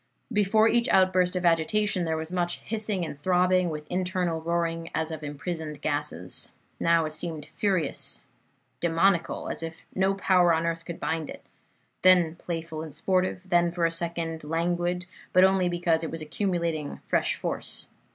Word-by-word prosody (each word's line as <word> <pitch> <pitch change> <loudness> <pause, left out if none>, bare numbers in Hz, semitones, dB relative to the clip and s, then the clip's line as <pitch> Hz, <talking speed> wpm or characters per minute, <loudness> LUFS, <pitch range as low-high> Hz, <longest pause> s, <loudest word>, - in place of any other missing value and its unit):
Before 215 +2 +4
each 235 +2 +2
outburst 185 -1 +3
of 180 -1 -1
agitation 180 +3 +2
there 160 -1 0
was 160 +1 -5
much 175 -1 -1
hissing 210 -5 -2
and 155 - -6
throbbing, 180 +3 +2
with 150 -1 -5
internal 180 -2 -1
roaring 165 0 -1
as 160 +1 -1
of 155 -1 -6
imprisoned 150 +1 -5
gases. 145 - -1 0.3
Now 165 -1 +3
it 155 - -5
seemed 155 -1 -5
furious, 185 -8 -1 0.6
demoniacal, 170 +1 +1
as - - -2
if 165 0 -7
no 190 +1 +2
power 180 -3 +4
on 165 +1 -1
earth 165 0 -2
could 170 -1 -6
bind 160 -2 -2
it, - - -9 0.6
then 180 -3 +5
playful 165 -2 -5
and 155 -3 -7
sportive; 185 +2 0
then 175 -2 +3
for 170 -1 0
a 165 - +2
second 165 -1 -2
languid, 175 +3 -1 0.3
but 185 - +6
only 190 -1 +4
because 175 -2 +1
it 160 - -2
was 165 -1 -5
accumulating 170 -3 -2
fresh - - +1
force. - - -3
170 Hz, 160 wpm, -27 LUFS, 160-185 Hz, 0.6 s, but